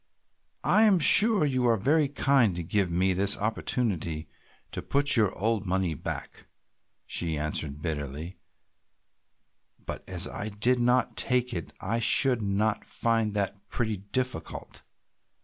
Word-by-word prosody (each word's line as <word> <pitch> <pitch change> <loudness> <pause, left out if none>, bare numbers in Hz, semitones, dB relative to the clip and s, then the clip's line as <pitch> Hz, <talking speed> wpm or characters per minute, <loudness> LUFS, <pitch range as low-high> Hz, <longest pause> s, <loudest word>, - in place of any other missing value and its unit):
"I 215 - +4
am 210 -4 +5
sure 200 +3 +6
you 130 -3 0
are 115 -1 +3
very 145 +8 +2
kind 135 -7 +2
to 85 - -4
give 95 +2 0
me 90 +2 +1
this 100 +2 +1
opportunity 100 -7 -2 0.4
to - - -5
put 145 +1 +2
your 105 -5 +3
old 110 -1 -1
money 95 -2 0
back," 75 - -7 0.6
she 80 -3 -3
answered 75 -1 -3
bitterly, 75 +2 -5 1.5
"but - - -6
as 90 -1 +1
I 105 - -5
did 120 +5 +1
not 125 +1 +1
take 125 -1 0
it 85 -3 -5
I 115 +5 -2
should 125 +1 +3 0.4
find 115 -2 -1
that 100 0 -3
pretty 110 -3 -2
difficult. 125 +7 -5
105 Hz, 130 wpm, -27 LUFS, 90-125 Hz, 1.5 s, sure